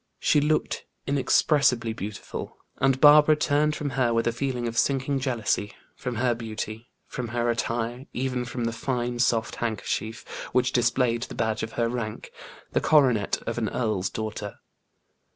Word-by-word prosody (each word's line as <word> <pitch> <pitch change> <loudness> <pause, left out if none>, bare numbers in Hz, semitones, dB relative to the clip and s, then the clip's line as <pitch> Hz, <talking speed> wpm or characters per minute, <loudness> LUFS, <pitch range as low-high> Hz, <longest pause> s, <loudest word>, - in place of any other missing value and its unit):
She 150 - +3
looked 155 +1 0 0.2
inexpressibly 135 -4 +2
beautiful, 105 -1 -6 0.2
and 135 -1 +2
Barbara 150 +1 +8
turned 150 0 +1
from 145 -2 -3
her 125 -2 +1
with 115 - +1
a 120 - +2
feeling 125 0 -2
of 115 - -4
sinking 135 +2 +1
jealousy, 115 -5 -1 0.2
from 125 -2 -4
her 120 +1 +2
beauty, 110 0 -6 0.2
from 125 - -5
her 120 +1 0
attire, 120 +2 -2
even 125 -1 -2
from 120 0 -4
the 115 - -1
fine, 120 0 -2
soft 115 -2 +1
handkerchief, 110 0 -3 0.3
which 125 0 +2
displayed 120 -1 +2
the - - -6
badge 110 -1 -1
of 110 0 -5
her 115 -1 +1
rank 115 -3 -4 0.4
the - - +1
coronet 125 -9 +3
of - - -2
an - - -1
earl's 105 -6 -1
daughter. 110 -2 -5
120 Hz, 155 wpm, -26 LUFS, 115-135 Hz, 0.4 s, Barbara